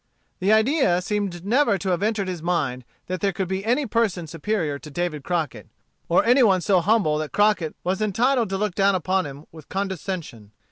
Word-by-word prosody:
The 195 +2 +2
idea 220 - +3
seemed 195 -2 -3
never 235 -1 +3
to 195 - -3
have 180 0 0
entered 210 -2 0
his 180 -3 -4
mind 145 -8 -1 0.2
that 185 -1 -4
there 200 - +2
could 190 0 -3
be 190 +1 -3
any 245 +6 +1
person 215 -7 0
superior 165 -2 -2
to 150 - -11
David 155 -2 -3
Crockett, 165 -4 -3 0.4
or 170 - +3
any 250 +3 +5
one 195 -6 +4
so 185 +1 +3
humble 185 -6 +2
that 155 -1 -4
Crockett 205 -7 +2
was 185 +3 -1
entitled 230 +2 +1
to 195 - -1
look 210 -1 -1
down 195 +1 +3
upon 185 -1 0
him 140 +2 -10
with 160 -3 -14
condescension. 185 - -5
190 Hz, 195 wpm, -23 LUFS, 170-210 Hz, 0.4 s, any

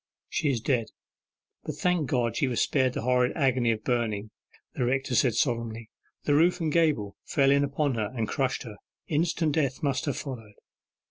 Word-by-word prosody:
'She 150 - 0
is 125 -5 0
dead: 115 -2 0 0.8
but 155 - -5
thank 165 -2 0
God, 120 -3 0
she 140 - +1
was 120 -2 -1
spared 130 -3 +2
the - - -3
horrid 125 0 +2
agony 130 -5 +2
of 110 -1 -3
burning,' 110 -4 -1 0.4
the - - -2
rector 130 +1 0
said 120 -1 +3
solemnly; 115 -3 -1 0.3
'the 145 - +2
roof 170 +5 +4
and 160 -3 -1
gable 150 -12 +1
fell 135 -2 +2
in 140 0 +4
upon 140 0 0
her, 110 -3 -2
and 115 -3 -1
crushed 130 +1 -1
her. 110 -4 -9 0.3
Instant 160 0 +1
death 140 -4 0
must 135 -2 0
have 145 - -2
followed. 115 -7 -7
130 Hz, 185 wpm, -27 LUFS, 115-145 Hz, 0.8 s, roof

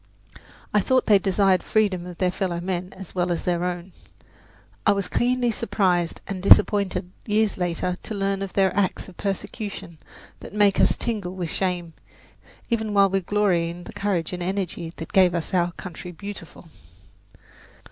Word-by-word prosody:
I 210 - +5
thought 255 +5 +2
they 205 -2 +6
desired 195 -1 +3
the - - -20
freedom 195 -5 +1
of 175 -1 -9
their 185 -1 +1
fellow 180 -2 -2
men 180 +1 -3
as 190 -2 -9
well 180 -1 0
as 170 - -2
their 175 -1 0
own. 180 +1 -3 0.9
I - - +5
was 200 -2 -2
keenly 245 0 +1
surprised 185 -6 0
and 190 -2 -5
disappointed 195 -2 +4 0.2
years 210 -1 +2
later 180 +1 -1
to 220 - -6
learn 195 0 -1
of 195 -1 -4
their 190 -2 +2
acts 200 -1 0
of 185 - -15
persecution 195 -3 -5 0.4
that - - -10
make 205 -2 +4
us - - +4
tingle 205 -6 -3
with 175 -4 -3
shame, 180 -3 -2 0.7
even 220 -3 -1
while 200 -1 +5
we 195 - +2
glory 185 -3 +1
in 175 +1 -8
the - - -10
courage 190 -5 -1
and 180 - -4
energy 180 -3 -3
that 165 - -8
gave 185 -2 +5
us 170 +1 -3
our 175 -1 +2
"Country 180 0 -8
Beautiful." 175 -2 -10
190 Hz, 170 wpm, -24 LUFS, 175-200 Hz, 0.9 s, they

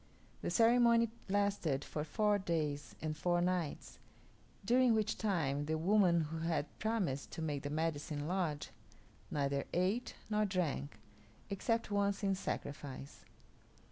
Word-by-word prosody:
The - - -2
ceremony 235 -1 +5 0.2
lasted 195 -8 +1
for 150 - -3
four 210 +5 +2
days 150 -6 -2
and 155 -1 -1
four 175 +2 +1
nights, 175 -3 -2 0.7
during 245 +1 +5
which 215 -1 +1
time 145 -9 0
the 160 0 0
woman 180 0 +4
who 160 +1 -4
had 165 -2 0
promised 195 -12 -1
to - - -5
make 145 -3 -2
the 145 - -4
Medicine 150 -1 -2
Lodge 170 -5 -1 0.6
neither 140 -1 0
ate 195 +8 0
nor 215 0 +1
drank, 170 - -1 0.5
except 225 +3 0
once 200 0 +1
in 195 -1 +3
sacrifice. 145 -6 -5
175 Hz, 130 wpm, -35 LUFS, 150-205 Hz, 0.7 s, ceremony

